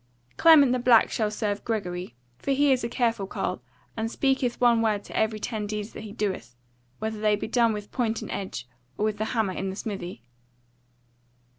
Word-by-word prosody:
"Clement 305 -6 +7
the 255 - +1
Black 240 -2 +5
shall 215 -2 0
serve 210 -1 -2
Gregory: 180 - -3 0.2
for - - -5
he 285 +1 +3
is 255 -2 +2
a 235 - -1
careful 230 -5 0
carle, 125 - -3 0.3
and 225 0 -2
speaketh 265 -1 0
one 235 -2 +4
word 210 -2 +1
to - - -11
every 220 0 +1
ten 210 -1 -3
deeds 210 0 -4
that - - -7
he 215 -1 -8
doeth; 195 - -3 0.4
whether 220 0 -4
they 210 -1 +3
be 205 - -4
done 230 0 +3
with 210 -1 -6
point 230 -3 0
and - - -7
edge, 160 -11 -5 0.3
or 210 - +1
with 215 -1 -1
the 215 - 0
hammer 220 -4 0
in 195 +1 -3
the 190 - -5
smithy. 185 - -6
220 Hz, 195 wpm, -26 LUFS, 205-235 Hz, 0.4 s, Clement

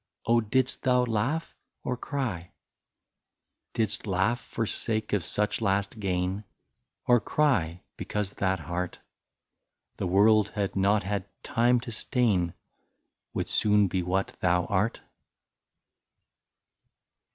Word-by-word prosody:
Oh! 115 0 +4
didst 125 +4 0
thou 125 -1 +3
laugh 125 +9 -1 0.3
or 125 - -1
cry? 120 - -4 0.6
" - - -58
Didst 110 -1 0
laugh 100 +5 +1
for 115 - -3
sake 110 0 -2
of 100 -4 +2
such 105 +6 0
last 100 +1 0
gain, 95 0 -1 0.6
Or 120 -1 +5
cry, 95 - +1
because 105 -2 -3
that 95 -2 0
heart. 90 +2 -3 1.0
The - - -2
world 105 +3 +5
had 100 -2 -2
not 100 +1 +3
had 100 0 -2 0.2
time 120 +1 +3
to 120 - -7
stain, 105 -8 +1 0.8
Would - - -1
soon 105 -1 +3
be 90 0 -1
what 95 +2 -1
thou 90 0 +2
art 100 +4 0
105 Hz, 120 wpm, -28 LUFS, 95-115 Hz, 1.0 s, Or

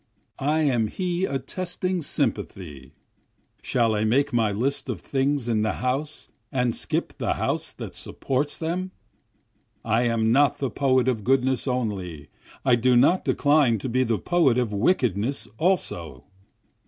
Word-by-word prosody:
I 150 +3 +1
am 125 -7 +2
he 180 - -1
attesting 180 +5 -3
sympathy, 75 - -3 0.7
(Shall 115 -2 +1
I 105 0 0
make 135 +6 +2
my 115 -3 +2
list 130 +7 -2
of 115 -8 -3
things 135 +4 -1
in 110 -2 +1
the 110 0 0
house 135 +5 -3 0.2
and 125 -3 0
skip - - -2
the - - 0
house - - -2
that - - -8
supports 140 +2 -2
them?) 175 +3 -2 1.0
I 115 +2 +2
am 115 -1 +1
not 140 +3 +4
the 135 -3 -2
poet 130 -3 +2
of 115 -5 0
goodness 130 +1 +1
only, 95 - -3 0.4
I 125 -2 +5
do 125 +1 +3
not 140 +10 +4
decline 145 -5 +3
to 125 - -5
be 130 +2 +2
the 115 -3 0
poet 165 - +2
of 120 -4 0
wickedness 120 - 0
also. 85 - -1
125 Hz, 145 wpm, -25 LUFS, 110-145 Hz, 1.0 s, I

